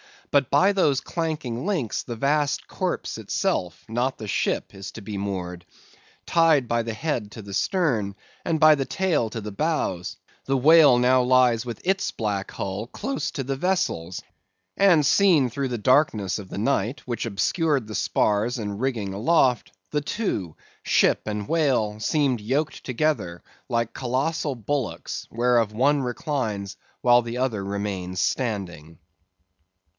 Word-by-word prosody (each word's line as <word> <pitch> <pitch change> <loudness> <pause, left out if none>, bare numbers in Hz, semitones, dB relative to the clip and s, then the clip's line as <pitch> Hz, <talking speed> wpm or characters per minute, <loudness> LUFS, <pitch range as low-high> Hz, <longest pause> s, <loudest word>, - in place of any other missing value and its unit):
But 140 -3 +3
by 195 +2 +4
those 150 -9 +2
clanking 155 -6 -3
links, 170 - -1
the 120 - -6
vast 145 +4 0
corpse - - -3
itself, 90 -1 -2
not 120 +4 -1
the 110 -2 -7
ship, - - -1
is 95 0 -8
to 115 - -9
be 100 0 -6
moored. 90 -3 -4 0.6
Tied 160 -7 +3
by 115 0 +1
the 115 0 -4
head 115 -5 -3
to 110 - -9
the 100 -1 -9
stern, 120 - 0 0.3
and 165 - +1
by 155 0 +7
the 135 -2 -2
tail 170 -12 0
to 115 +1 -5
the 105 0 -6
bows, 100 - -2 0.3
the 135 0 +1
whale 150 -1 +7
now 125 +1 +4
lies 125 -2 +3
with 120 -3 -6
its 190 +1 +1
black 100 -3 -3
hull 100 +3 -4
close 270 - -3
to 135 - -4
the 135 +1 -3
vessel's 95 - -1 0.5
and 175 -7 +5
seen 165 -5 +4
through 140 +2 -2
the 125 -2 -3
darkness 110 -5 +2
of 95 -2 -10
the - - -7
night, 115 +2 0
which 120 -2 -3
obscured 140 - 0
the 110 - -8
spars 105 +5 +1
and 105 -3 -4
rigging 115 -7 -2
aloft, 125 +2 +2 0.2
the 150 - 0
two—ship 140 - -1
and 105 -1 -3
whale, 125 -10 +1
seemed 135 0 +1
yoked 140 +8 -2
together 130 - -1 0.3
like 115 -1 -1
colossal 135 +3 -1
bullocks, 125 +3 -4
whereof 120 -2 +2
one 140 +5 +2
reclines 115 -7 -3 0.2
while 120 0 +5
the 120 +1 -5
other 120 -6 -1
remains 95 -2 -3
standing. 90 - -3
120 Hz, 150 wpm, -24 LUFS, 105-145 Hz, 0.6 s, by